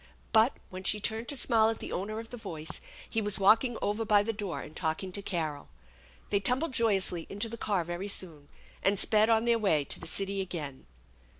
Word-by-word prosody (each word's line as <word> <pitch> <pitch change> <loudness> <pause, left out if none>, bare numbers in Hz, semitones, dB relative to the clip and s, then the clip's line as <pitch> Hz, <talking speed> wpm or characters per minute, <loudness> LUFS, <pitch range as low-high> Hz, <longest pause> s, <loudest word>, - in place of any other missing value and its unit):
But, 225 +3 +5 0.2
when 185 0 -7
she 210 - +2
turned 225 +2 0
to 285 - -1
smile 225 -3 +4
at 225 - -2
the - - -7
owner 215 +4 -3
of 225 0 -9
the - - -5
voice, 160 -8 -5 0.3
he 225 - -1
was 205 -2 +3
walking 225 +5 +4
over 210 +2 0
by 210 -2 +4
the 225 +2 -2
door 205 -4 -4
and 155 - -11
talking 165 +3 -2
to 200 - -4
Carol. 160 -7 -3 0.6
They 200 - +3
tumbled 255 +8 0
joyously 195 -7 +1
into 205 +3 -3
the 230 - -6
car 205 -5 -1
very 175 +4 -5
soon, 165 -7 -2 0.3
and 200 +1 +2
sped 215 +3 +4
on 225 0 +3
their 235 -1 +3
way 160 -9 +2
to - - -3
the - - -4
city 195 0 -1
again. 155 -8 -6
205 Hz, 210 wpm, -30 LUFS, 180-225 Hz, 0.6 s, But